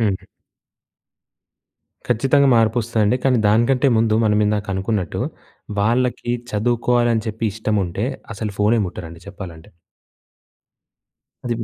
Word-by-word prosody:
హుహు. 100 -4 -1 1.8
ఖచ్చితంగా 135 +4 +3
మార్పొస్తదండి. 115 0 +2
కానీ 130 -2 +3
దానికంటే 120 +5 +3
ముందు 110 -1 +2
మనం 105 -1 +3
ఇందాక 105 0 -1
అనుకున్నట్టు, 95 -2 -2 0.6
వాళ్ళకి 120 +3 0 0.2
చదువుకోవాలని 120 +1 +1
చెప్పి 110 +1 -3
ఇష్టముంటే, 105 -1 -1 0.3
అసలు 105 0 -4
ఫోనే 110 +3 +3
ముట్టరండి 85 -1 -9
చెప్పాలంటే. 85 -5 -10 1.7
అది 120 - 0
మ్ - - -2
110 Hz, 100 wpm, -20 LUFS, 105-120 Hz, 1.8 s, ఖచ్చితంగా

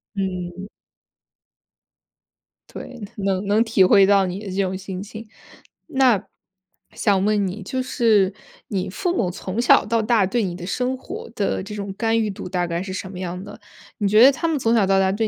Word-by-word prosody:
嗯。 185 0 -4 2.0
对， 250 -2 -9 0.2
能 195 -1 -1
能 215 +3 +3
体 225 -4 +3
会 195 +1 +6
到 200 -1 +4
你 185 +2 -5
的 215 - -10
这 195 - +1
种 190 0 -2
心 190 0 -6
情， 215 +2 -9 0.6
那 260 - +3 0.7
想 195 -2 +1
问 210 -1 +2
你 195 +3 -6
就 255 +7 -3
是 215 -6 +2 0.3
你 190 -3 -2
父 355 - -2
母 180 - +1
从 190 +4 -5
小 245 - +5
到 225 +2 +1
大， 220 -3 +3
对 235 +2 0
你 175 -2 -3
的 175 -1 -7
生 250 +6 -1
活 260 - -8
的 200 -2 -1
这 200 - -8
种 200 -2 -5
干 225 -1 +1
预 215 - -1
度， 195 - -7
大 180 -1 -1
概 170 +1 -2
是 190 -1 -6
什 190 0 -5
么 185 - -9
样 180 0 -5
的？ 205 - -11 0.4
你 205 - 0
觉 215 +3 +6
得 270 - +9
他 315 +5 -2
们 320 -2 0
从 230 -1 +1
小 215 -4 +4
到 195 0 +3
大， 190 0 +2
对 215 +2 0
200 Hz, 210 characters per minute, -22 LUFS, 190-225 Hz, 2.0 s, 得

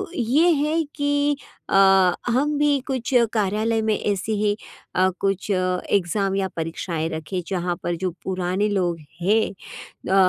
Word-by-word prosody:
ये 290 +7 +3
है 310 +2 +1
कि 285 0 +1 0.3
अ, - - +1 0.6
हम 290 +4 +1
भी 290 -1 +3
कुछ 265 0 -2 0.2
कार्यालय 220 +2 +1
में 220 -1 +1
ऐसे 205 +1 -1
ही 210 0 +1 0.4
अ, 185 +1 +4
कुछ 195 +1 -1
एग्ज़ाम 185 +1 0
या 195 -1 0
परीक्षाएँ 165 0 -3
रखें, 160 +3 -4
जहाँ 180 -2 -1
पर 175 - -1
जो 180 +1 -2
पुराने 185 +2 -1
लोग 175 -5 0 0.2
हैं। 215 +5 +3 0.6
अ, - - +3
200 Hz, 140 wpm, -23 LUFS, 185-250 Hz, 0.6 s, अ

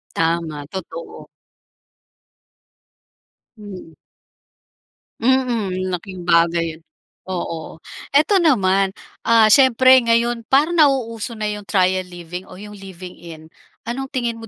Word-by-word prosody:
Tama, 165 -3 -1
totoo. 170 -3 -8 2.3
Mm. 190 -6 -11 1.3
Mm, 260 +3 +3
ang 215 -5 -2 0.3
laking 185 -1 -10
bagay 170 -1 +1
'yon, - - -30 0.5
oo. 170 -3 -5 0.4
Eto 375 +7 +4
naman, 195 - +2 0.3
ah, 225 -2 +5
siyempre 260 0 +6
ngayon, 235 -1 0
parang 290 +5 +3
nauuso 240 -6 +1
na 215 - -6
yung 210 -1 -8
trial 185 -1 +1
living 175 +1 -9
o - - -12
yung 210 +2 -10
living 190 -3 -11
in, 160 -1 -12 0.3
anong 265 +4 -4
tingin 240 -4 -3
mo 225 - -10
200 Hz, 110 wpm, -20 LUFS, 175-235 Hz, 2.3 s, siyempre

